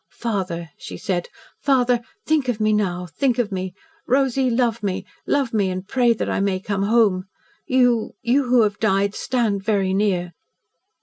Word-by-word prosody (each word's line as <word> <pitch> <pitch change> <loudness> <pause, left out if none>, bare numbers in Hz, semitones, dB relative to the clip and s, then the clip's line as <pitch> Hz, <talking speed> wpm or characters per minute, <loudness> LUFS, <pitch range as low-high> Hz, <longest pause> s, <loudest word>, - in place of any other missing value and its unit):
"Father," 185 -8 -3
she - - -8
said. 175 -2 -2 0.3
"Father, 250 -3 +3 0.2
think 310 -4 +1
of 240 -3 -1
me 215 0 +2
now 180 -4 0
think 250 +8 0
of 235 -4 0
me! 185 -1 -4 0.3
Rosy, 265 0 +2
love 235 -1 +1
me 195 -3 -2 0.2
love 275 -5 +1
me 200 -3 +2
and 185 +1 -5
pray 245 0 +3
that 230 - -1
I - - -1
may 195 -1 0
come 195 0 -2
home. 200 -3 +3 0.4
You 245 -3 +2
you 260 +4 +2
who 245 -1 +4
have 205 -1 -1
died, 200 -1 +2
stand 225 -6 0
very 195 -3 +1
near!" 185 -4 0
215 Hz, 170 wpm, -22 LUFS, 190-245 Hz, 0.4 s, who